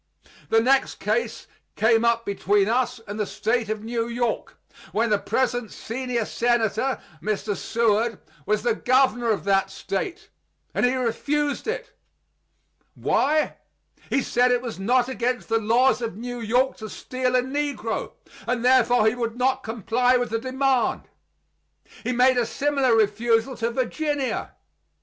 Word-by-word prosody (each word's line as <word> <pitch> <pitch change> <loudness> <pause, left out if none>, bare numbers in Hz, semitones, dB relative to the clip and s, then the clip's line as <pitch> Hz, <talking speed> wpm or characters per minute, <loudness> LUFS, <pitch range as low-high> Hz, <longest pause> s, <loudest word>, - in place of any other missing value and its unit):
The 225 - +5
next 265 +3 +2
case 475 - -2 0.3
came 225 +1 +3
up 230 0 +2
between 200 0 +1
us 245 +1 0
and 205 +2 -6
the 210 - +1
State 225 -1 -1
of 215 -1 -3
New 230 0 -2
York, 235 0 -2 0.4
when 225 +1 +1
the 210 - +3
present 245 -2 -1
senior 240 -1 -3
senator 240 +2 0 0.2
[Mr. 210 0 -2
Seward] 225 +1 +1 0.3
was 210 0 +1
the 240 -1 +2
governor 245 0 +2
of 215 - 0
that 195 -1 +2
State; 350 - -4 0.4
and - - +2
he 255 - 0
refused 285 - -1
it. 455 +3 -4 1.0
Why? 305 +2 +1 0.5
He 270 - +1
said 250 +1 +2
it 245 0 +1
was 235 -5 -6
not 245 +5 +2
against 250 -1 -2
the 225 0 +2
laws 245 +4 +3
of 225 -5 -4
New 245 +1 -5
York 245 +4 +1
to 215 -1 -7
steal 255 +5 -2
a 250 - +3
negro, 285 +2 -3 0.3
and 245 -1 -1
therefore 245 -2 +4
he 220 - +4
would 235 -2 -3
not 260 +1 +1
comply 235 +3 +1
with 245 -3 -2
the 225 - 0
demand. 260 +1 0 1.0
He - - -1
made 250 +1 +4
a 235 - 0
similar 275 -4 +1
refusal 225 +4 +2
to 230 0 0
Virginia. 270 +3 -2
240 Hz, 150 wpm, -24 LUFS, 225-255 Hz, 1.0 s, The